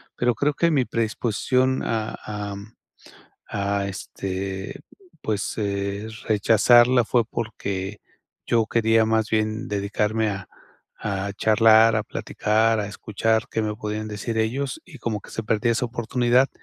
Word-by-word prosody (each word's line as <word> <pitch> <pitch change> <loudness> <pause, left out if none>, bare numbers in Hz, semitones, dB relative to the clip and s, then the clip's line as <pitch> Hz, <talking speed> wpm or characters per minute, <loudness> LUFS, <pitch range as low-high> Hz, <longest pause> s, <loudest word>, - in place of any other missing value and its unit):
Pero 120 0 +2
creo 145 +6 +1
que 170 +2 +2
mi 135 -4 +2
predisposición 120 +3 0
a, 110 -1 -2
am, 105 0 -6 0.7
a 100 0 -1
este, 95 0 -5 0.4
pues 105 -2 -2
eh, 100 0 -2 0.2
rechazarla 120 +3 +5
fue 120 0 +2
porque 100 -3 -4 0.5
yo 115 -2 +3
quería 110 0 +3
más 110 0 +1
bien 110 +2 0
dedicarme 105 +2 0
a 95 -2 -6 0.5
a 100 -1 -2
charlar, 110 +1 +5
a 110 - +1
platicar, 110 +1 +1
a - - -3
escuchar 110 +2 -1
qué 110 - -1
me 105 -1 -1
podían 105 0 -4
decir 110 +2 -4
ellos, 125 +5 -1
y - - -12
como 105 -3 -3
que - - -14
se 115 - -4
perdió 110 +2 +1
esa 120 +2 0
oportunidad, 120 +2 +2
110 Hz, 135 wpm, -24 LUFS, 105-115 Hz, 0.7 s, rechazarla